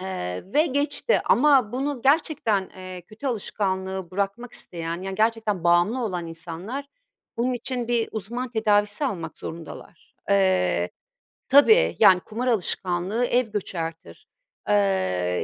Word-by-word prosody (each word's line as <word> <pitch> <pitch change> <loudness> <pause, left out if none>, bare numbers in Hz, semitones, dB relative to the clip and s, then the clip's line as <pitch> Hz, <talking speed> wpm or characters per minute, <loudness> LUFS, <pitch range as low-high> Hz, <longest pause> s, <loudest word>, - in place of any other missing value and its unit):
Eee, 90 - -4
ve 305 +3 +4
geçti 285 - +1
ama 260 -4 +4
bunu 270 -1 -2
gerçekten, 265 - +2
eee, 185 -1 -8
kötü 215 +9 -9
alışkanlığı 190 -5 -2
bırakmak 200 +5 -3
isteyen 170 +1 -5
yani 195 0 -4
gerçekten 220 -3 0
bağımlı 175 +9 +3
olan 180 -5 -3
insanlar 170 +12 -6 0.5
bunun 245 +2 0
için 245 -1 -2
bir 235 -2 +1
uzman 235 +4 -4
tedavisi 210 +2 +1
almak 170 - -4
zorundalar. 165 0 -10 0.2
Eee 90 - +2 0.6
Tabii, 440 - +6
yani, 190 -4 +7
kumar 230 +7 -5
alışkanlığı 190 0 0
ev 245 -1 +1
göçertir, 165 - -5 0.4
eee, 95 -3 +1
200 Hz, 120 wpm, -24 LUFS, 175-245 Hz, 0.6 s, yani